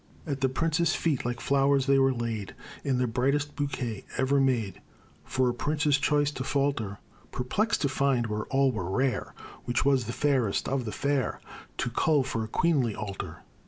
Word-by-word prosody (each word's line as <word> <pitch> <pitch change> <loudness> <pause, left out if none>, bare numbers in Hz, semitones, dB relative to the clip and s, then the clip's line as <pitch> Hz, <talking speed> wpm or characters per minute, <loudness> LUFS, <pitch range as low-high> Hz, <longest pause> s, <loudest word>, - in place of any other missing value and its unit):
At 140 -4 -3
the 135 - +3
prince's 165 +4 +1
feet 150 -8 0
like 120 -1 -2
flowers 140 0 +2
they 135 0 +4
were 135 0 +4
laid, 115 -5 -4 0.3
In 135 -3 +1
the 125 - +2
brightest 140 +5 0
bouquet 130 -7 -3
ever 135 +1 +2
made, 125 -7 0 0.4
For 130 0 +1
a 120 - +1
prince's 145 +2 +1
choice 145 +1 +2
to 130 -3 -5
falter 135 -8 -1 0.3
Perplexed 205 - 0
to - - +3
find, 130 -3 +1
where 105 -1 -3
all 135 0 +2
were 95 -7 -4
rare, 130 +6 -1 0.3
Which 120 0 0
was 135 -4 +3
the 115 - -3
fairest 130 -8 +1
of 135 -2 -1
the 110 - -3
fair 140 +4 -1 0.4
To 120 - -1
cull 150 +3 +2
for 130 -4 -2
a - - -4
queenly 130 -4 +1
altar. 100 -2 -6
130 Hz, 180 wpm, -28 LUFS, 120-140 Hz, 0.4 s, they